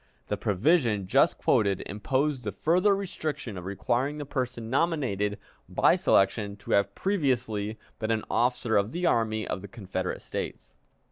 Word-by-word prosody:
The - - +1
provision 110 - +2
just 90 - +3
quoted 100 -3 +2
imposed 130 +6 -1
the 105 - -2
further 180 - +3
restriction 155 - -4
of 90 -1 -7
requiring 120 +9 -1
the 145 - -5
person 125 -4 -3
nominated 120 - 0 0.3
by - - +4
selection 100 +1 +2
to 100 - -9
have 100 0 +2
previously 120 - 0 0.2
been 110 - -2
an 110 -1 0
officer 120 -2 +1
of 100 +3 0
the 175 +1 -1
Army 110 -6 +1
of - - -3
the 100 - -8
Confederate 95 -2 -4
States. - - -6
115 Hz, 150 wpm, -28 LUFS, 100-140 Hz, 0.3 s, by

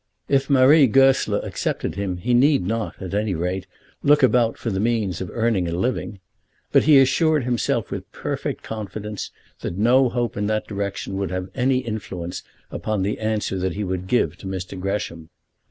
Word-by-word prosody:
If 135 0 +1
Marie 140 +2 +6
Goesler 135 +3 +3
accepted - - -3
him, 95 -1 -3
he 120 +8 -1
need 135 -3 +4
not, 110 +2 -3
at 95 -1 -6
any 105 -2 0
rate, 90 +3 -3 0.3
look 150 0 +4
about 120 -3 +3
for 115 - -3
the 95 - -1
means 105 -5 0
of 90 - -4
earning 110 -6 +1
a - - -3
living. 105 +1 -2 0.5
But - - +4
he 150 -2 +7
assured 150 +2 +3
himself 120 -2 -1
with - - -6
perfect - - -4
confidence 105 -1 -5 0.3
that 85 - -5
no 125 +5 +4
hope 120 -1 -2
in 105 0 -1
that 110 0 0
direction 100 -1 -4
would 100 -1 -2
have 95 0 -4
any 130 0 +1
influence 90 -6 -5 0.3
upon 105 -3 -2
the 100 +2 -2
answer 110 -3 -1
he 100 +4 -4
would 95 -1 -3
give 120 +4 +1
to 95 - -9
Mr. 95 0 -5
Gresham. 90 -4 -3
105 Hz, 175 wpm, -22 LUFS, 95-125 Hz, 0.5 s, he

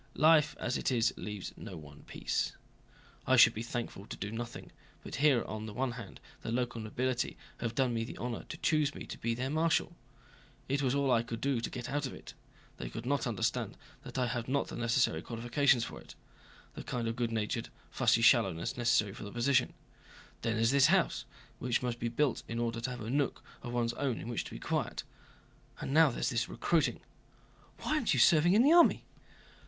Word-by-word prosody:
"Life 155 0 +5
as 125 - -1
it - - 0
is 115 -2 +2
leaves 105 -3 -6
one - - -9
no 75 -1 -13
peace. - - -2 0.7
I - - +5
should - - +8
be 110 - -5
thankful 115 -4 -5
to - - -7
do 100 - -4
nothing, 120 +1 -6 0.3
but - - -6
here 140 -3 +4
on 110 0 -6
the 105 - -8
one 130 +1 0
hand 115 -4 -9 0.2
the - - -4
local 120 -1 -1
nobility 125 +3 -2 0.2
have 115 -1 -3
done 130 -3 +2
me 115 -1 -1
the 115 - -7
honor 120 -1 -4
to - - -6
choose 155 -3 +1
me - - -7
to - - -7
be 115 0 -1
their 130 +3 -2
marshal; 165 +2 +1 0.7
it 140 +2 0
was 135 -1 +1
all 140 -2 +2
I 115 - +4
could 115 -1 -6
do 135 -2 0
to - - -3
get 125 -2 -6
out 145 -1 -1
of - - -8
it. - - -11 0.4
They - - -5
could 115 - -7
not 140 0 0
understand 110 -6 -1 0.2
that - - -8
I 125 - +2
have 120 -1 -3
not 140 +2 0
the - - -6
necessary 115 -8 +1
qualifications 120 +3 +2
for - - -7
it—the - - -15
kind 120 -2 -2
of 115 - -2
good 120 -1 -1
natured, 115 +2 -2 0.2
fussy 115 - +3
shallowness 105 -9 +3
necessary 120 -5 +2
for - - -9
the 100 - -7
position. 125 +2 +2 0.7
Then 115 -1 0
there's 115 +2 +3
this 140 -1 +6
house, - - +2 0.3
which 125 0 0
must 120 -1 -2
be 120 - -1
built 130 +2 0
in 115 - -4
order 115 0 -1
to 130 - -2
have 125 -2 -6
a 110 +2 -4
nook 140 0 0 0.2
of 120 - -6
one's 120 -1 0
own 130 -2 -2
in 115 - -6
which 120 - -2
to - - -9
be - - -7
quiet. - - -2 0.8
And 135 - -3
now 160 0 +7
there's 130 - -1
this 120 -1 0
recruiting." 170 -2 +1 0.8
"Why - - -1
aren't 305 -7 +2
you - - +1
serving 170 +2 +6
in 220 +4 +6
the 295 +4 +6
army?" 345 0 +6
120 Hz, 210 wpm, -32 LUFS, 115-135 Hz, 0.8 s, should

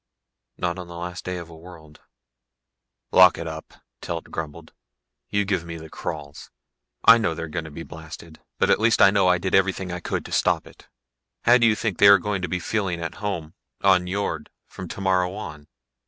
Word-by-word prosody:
"Not 85 +1 -2
on 90 - -7
the 85 - -10
last 90 +1 -6
day 90 0 -3
of 85 -2 -7
a 85 - -13
world." 80 -2 -14 1.1
"Lock 90 -1 +7
it 85 - -5
up," 80 -1 -8 0.3
Telt - - -5
grumbled. 80 0 -7 0.6
"You 100 -1 +1
give 95 -4 -1
me 85 0 -7
the 80 -1 -11
crawls. 75 -2 -7 0.6
I 115 +1 +9
know 105 -7 0
they're 80 0 -5
going 80 +1 -4
to - - -8
be 80 +3 -8
blasted. 80 0 -11 0.2
But - - +2
at - - +4
least 110 +1 +3
I 95 - +7
know 100 -2 +3
I 90 0 +4
did 95 +1 -4
everything 95 -1 +1
I 90 - -4
could - - -3
to - - -10
stop - - +1
it. - - -17 0.6
How 120 +1 +6
do 115 - +5
you 110 - +3
think 110 -5 -3
they 100 - +8
are 100 0 +9
going 100 0 -3
to 90 - -3
be 90 - -1
feeling 95 -3 -2
at 85 0 -4
home 90 -7 -4 0.3
on 95 -2 +4
Nyjord 90 -5 -3 0.2
from 95 - -9
tomorrow 95 0 0
on?" 75 -8 -8
90 Hz, 205 wpm, -24 LUFS, 80-95 Hz, 1.1 s, I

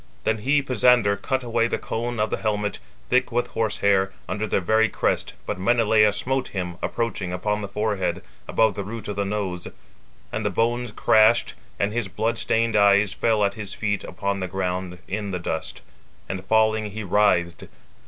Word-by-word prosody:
Then 110 0 0
he 140 +6 +2
(Pisander) 125 -4 +4
cut 130 +6 -2
away 115 -1 +1
the - - -1
cone 120 0 -4
of 105 0 0
the - - 0
helmet, 105 -1 -1 0.3
thick 125 0 +3
with 120 +1 0
horse 110 -2 -2
hair, 95 -1 +3 0.2
under 110 +1 -2
the - - +1
very 110 +5 +2
crest, - - -1
but - - -3
(Menelaus 105 0 +3
smote) 130 +4 -1
him, 90 -3 -5
approaching, 115 -6 -2
upon 105 +4 -1
the 100 - -4
forehead, 100 -4 -2 0.2
above 110 -1 +3
the 100 - -4
root 110 +3 -7
of 105 - -3
the 100 0 -1
nose. 100 -4 -3 0.6
And 110 - -3
the 105 - +1
bones 120 +4 0
crashed, 110 +2 +4 0.3
and 100 +1 0
his 120 -3 -1
blood 110 +5 -1
stained 115 0 +1
eyes 100 -1 +4
fell 110 -2 +1
at 100 - 0
his 100 -1 -6
feet 100 -2 -1
upon 100 -1 -3
the 95 - -2
ground 90 -1 -3
in 100 +1 -3
the 95 - -2
dust: 80 -2 -4 0.4
and 95 -1 -4
falling, 110 -1 +2
he 110 +2 -6
writhed. 90 -4 +1
105 Hz, 185 wpm, -24 LUFS, 100-115 Hz, 0.6 s, Pisander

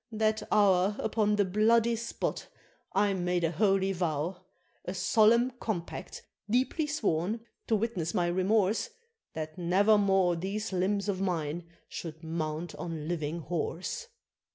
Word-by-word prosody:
That 215 0 +1
hour, 200 -1 +4
upon 210 -1 +1
the 205 -1 +3
bloody 225 +4 +3
spot, 230 +1 -3 0.4
I 200 0 +2
made 180 -1 0
a 165 - +2
holy 195 +2 +2
vow; 175 -1 -1 0.5
A 180 - -5
solemn 230 +6 +4
compact, 180 -7 -5 0.3
deeply 260 +7 +1
sworn, 220 - 0 0.3
to 225 - +3
witness 205 -7 -2
my 175 - +2
remorse, 190 - +1 0.4
That 155 +2 -6
never 200 +5 +4
more 190 -3 +3
these 195 +4 -3
limbs 200 +2 0
of 190 -2 -1
mine 170 -3 -2 0.2
should 160 -1 -7
mount 160 0 -3
on 165 -4 -5
living 165 -1 -2
horse!" 175 - -3
190 Hz, 130 wpm, -30 LUFS, 170-215 Hz, 0.5 s, hour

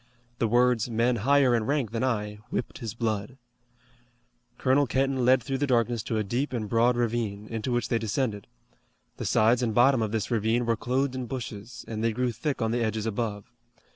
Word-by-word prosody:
The 115 - +2
words, 120 0 +3
"men 120 +2 +1
higher 135 +3 +4
in 115 -2 0
rank 140 -7 0
than 115 +1 -2
I," 105 -5 -1
whipped 125 - -4
his 115 -2 -5
blood. 110 +1 -2 1.2
Colonel 135 +2 +3
Kenton 135 0 0
led 130 -1 +4
through 135 +1 -2
the 145 - 0
darkness 120 -2 +1
to 110 - -1
a 110 - +1
deep 125 +6 -2
and 110 -4 -2
broad 120 +2 +3
ravine, 115 -3 -1
into 115 +2 -3
which 120 -2 0
they 115 - +1
descended. 110 -2 -2 0.7
The - - -5
sides 115 +3 +3
and 115 -3 -1
bottom 125 0 +5
of 110 -2 -1
this 110 +1 -2
ravine 115 +2 +1
were 115 0 +2
clothed 130 +4 -1
in 130 -2 -4
bushes, 115 -2 -7
and 110 -1 -4
they 115 -1 +1
grew 125 +2 0
thick 130 +2 -2
on 110 - 0
the 120 0 0
edges 110 -1 -1
above. 110 -2 -3
120 Hz, 200 wpm, -27 LUFS, 110-125 Hz, 1.2 s, bottom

